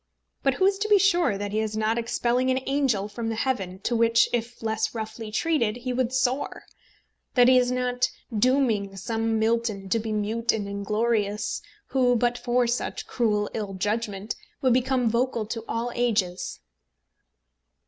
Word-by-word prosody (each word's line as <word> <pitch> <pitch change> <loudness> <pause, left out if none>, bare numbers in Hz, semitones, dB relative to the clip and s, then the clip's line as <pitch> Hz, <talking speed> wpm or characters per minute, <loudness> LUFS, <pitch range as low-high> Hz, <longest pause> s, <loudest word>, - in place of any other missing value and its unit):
But 270 -2 +2
who 375 - +2
is 390 0 +2
to 430 +1 -1
be 415 - +7
sure 350 - +3
that 205 0 -4
he 215 - 0
is 215 -1 -2
not 220 +2 +1
expelling 240 +2 0
an 260 0 +1
angel 265 -8 +1
from 225 +2 -4
the 225 - -2
heaven 215 -7 -2
to 240 - -1
which, 230 0 +4
if 235 0 -3
less 220 +1 -1
roughly 220 0 -5
treated, 235 -4 +1
he 250 +1 -3
would 250 -1 0
soar, 260 +1 -1 0.7
that 245 -1 +6
he 255 - +7
is 245 0 +1
not 250 0 0 0.3
dooming 220 -4 +2
some 225 +3 -1
Milton 220 -3 0
to 230 - +2
be 220 0 -4
mute 220 +2 0
and 210 -2 -3
inglorious, 210 +1 -1 0.3
who, 250 -2 +3
but 240 +1 +2
for 245 0 +1
such 240 +1 -2
cruel 210 -4 0
ill 205 -3 -4
judgment, 205 +1 -2 0.2
would 255 -2 +3
become 255 -1 +2
vocal 235 0 0
to 225 +1 -5
all 235 +2 -2
ages? 205 - -1
230 Hz, 170 wpm, -26 LUFS, 215-250 Hz, 0.7 s, be